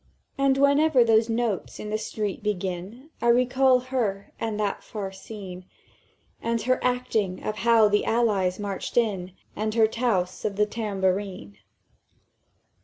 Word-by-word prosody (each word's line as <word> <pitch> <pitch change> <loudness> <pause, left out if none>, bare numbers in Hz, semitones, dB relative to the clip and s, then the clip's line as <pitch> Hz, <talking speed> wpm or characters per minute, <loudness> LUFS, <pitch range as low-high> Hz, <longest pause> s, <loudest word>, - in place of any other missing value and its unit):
"And 275 -1 +2
whenever 280 -1 +4
those 225 0 +3
notes 225 -4 -2
in 210 - -6
the 215 - +1
street 210 -2 -3
begin, 200 - -4
I 235 - +1
recall 255 +2 +4
her, 200 -6 -1
and 220 -2 -3
that 205 -1 -1
far 200 -3 -5
scene, 190 -2 -9 0.8
And 230 0 0
her 255 +2 +1
acting 225 -7 -1
of 215 - -3
how 230 -2 +5
the 205 0 +1
Allies 205 -6 +1
marched 200 +1 -5
in, 195 -6 0 0.2
And 215 +1 -2
her 225 -1 +5
touse 220 -6 -1
of 205 -2 -2
the 210 +1 +3
tambourine!" 195 - -2
215 Hz, 140 wpm, -25 LUFS, 195-235 Hz, 0.8 s, how